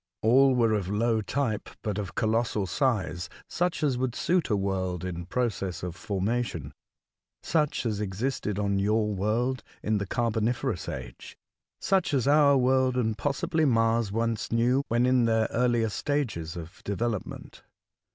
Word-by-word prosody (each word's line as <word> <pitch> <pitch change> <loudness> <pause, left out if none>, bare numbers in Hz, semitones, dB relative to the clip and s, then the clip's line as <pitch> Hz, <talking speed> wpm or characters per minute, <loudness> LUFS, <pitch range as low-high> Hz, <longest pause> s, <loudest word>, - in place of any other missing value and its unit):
All 130 +4 +5
were 115 -3 +3
of 100 -4 -1
low 110 +2 +1
type, 115 -1 -2
but 105 -1 -2
of 95 -2 -5
colossal 110 -2 +1
size, 95 - -1 0.2
such 175 -2 -1
as 135 -4 +1
would 130 -2 -1
suit 180 -1 +1
a 105 - +2
world 95 -2 -2
in 85 -1 -5
pro 125 +5 +1
cess 95 -4 -5
of 90 -2 -4
formation, 100 - -2 0.4
— - - -64 0.3
such 150 -5 0
as 105 -3 -1
existed 105 +1 -2
on 100 -1 0
your 105 +1 +1
world 115 +6 0 0.2
in 105 -1 +1
the 100 - -3
carboniferous 115 0 -1
age, - - -8 0.2
— - - -64
such 190 -6 +1
as 130 -1 +1
our 145 -1 +5
world 130 0 +2
and, 110 -3 +1
possibly. 160 - 0
Mars 115 -5 +2
once 115 0 -1
knew, 120 +4 +3
when 120 +2 +2
in 125 -1 +3
their 110 -1 +2
earlier 120 -2 +2
stages 105 - -2
of 85 0 -10
development. 110 +1 -4
115 Hz, 160 wpm, -27 LUFS, 100-130 Hz, 0.4 s, All